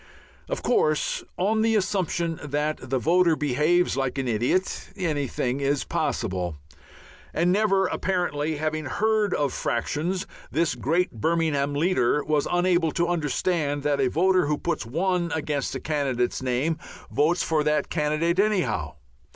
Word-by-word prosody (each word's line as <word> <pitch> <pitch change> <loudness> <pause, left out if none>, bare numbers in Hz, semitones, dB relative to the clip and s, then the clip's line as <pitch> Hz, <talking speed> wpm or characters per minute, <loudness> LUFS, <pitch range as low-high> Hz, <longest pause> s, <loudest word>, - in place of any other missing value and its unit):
Of - - -3
course 155 -11 +1
on 215 +4 +1
the 225 0 +2
assumption 180 -5 0
that 145 -2 -2
the 135 - +1
voter 170 +4 +3
behaves 150 +5 +2
like 135 0 -1
an 135 -1 -1
idiot, 120 - 0
anything 145 - -1
is 140 0 0
possible. 90 -7 -2 0.8
And 175 +3 +3
never 195 -1 +3
apparently 170 -5 -1
having 155 0 -2
heard 215 +6 +1
of 145 -3 0
fractions, 170 +10 -1 0.2
this 165 +1 +1
great 160 +9 0
Birmingham 145 +2 0
leader 150 -4 +2
was 150 -1 +1
unable 175 -2 +2
to 170 0 +1
understand 150 -2 0
that 145 -1 +1
a 130 - +2
voter 185 +2 +3
who 150 0 +1
puts 170 -10 -2
1 175 +5 0
against 150 -3 -2
a - - -2
candidate's 135 -6 -1
name 130 +6 0 0.3
votes 150 +9 +2
for 155 -2 +1
that 150 0 +1
candidate 165 +3 0
anyhow. 180 - +1
155 Hz, 140 wpm, -25 LUFS, 140-180 Hz, 0.8 s, voter